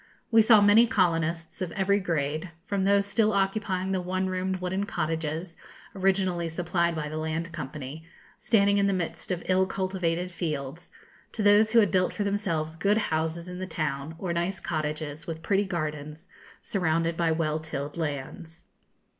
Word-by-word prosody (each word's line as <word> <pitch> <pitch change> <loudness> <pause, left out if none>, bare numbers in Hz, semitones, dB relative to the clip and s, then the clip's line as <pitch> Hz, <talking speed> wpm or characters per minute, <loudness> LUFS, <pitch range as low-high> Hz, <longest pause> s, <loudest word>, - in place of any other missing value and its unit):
We 225 -1 +7
saw 220 -1 +7
many 210 +3 +6
colonists, 165 -5 0
of 180 -3 -2
every 200 +1 +2
grade, 160 -2 -2 0.2
from 200 -1 -1
those 200 0 +4
still 215 +1 +2
occupying 195 -1 0
the 190 -1 0
one 185 +1 -1
roomed 185 0 -1
wooden 185 +2 -2
cottages, 160 +1 -3 0.4
originally 190 -3 +1
supplied 170 0 0
by 155 -1 -3
the 155 +1 -5
Land 160 +2 -3
Company, 150 0 -7 0.3
standing 200 -2 +3
in 200 0 +3
the 200 - +2
midst 165 -2 -3
of 180 -2 -2
ill 185 0 +3
cultivated 185 -2 -1
fields, 155 -1 -4 0.4
to 215 - -2
those 210 +2 +5
who 235 - +7
had 205 -5 +2
built 185 0 +2
for 205 - -2
themselves 170 -6 -1
good 200 +5 +2
houses 160 -3 -1
in 180 0 -7
the 185 - -4
town, 155 -2 -3
or 175 -1 -3
nice 175 +2 -1
cottages, 155 -1 -3
with 165 -1 -5
pretty 200 +3 +2
gardens, 155 -2 -4 0.4
surrounded 165 -5 0
by 165 -1 +1
well 160 -1 0
tilled 145 -2 -5
lands. 160 +1 -5
175 Hz, 165 wpm, -27 LUFS, 160-195 Hz, 0.4 s, We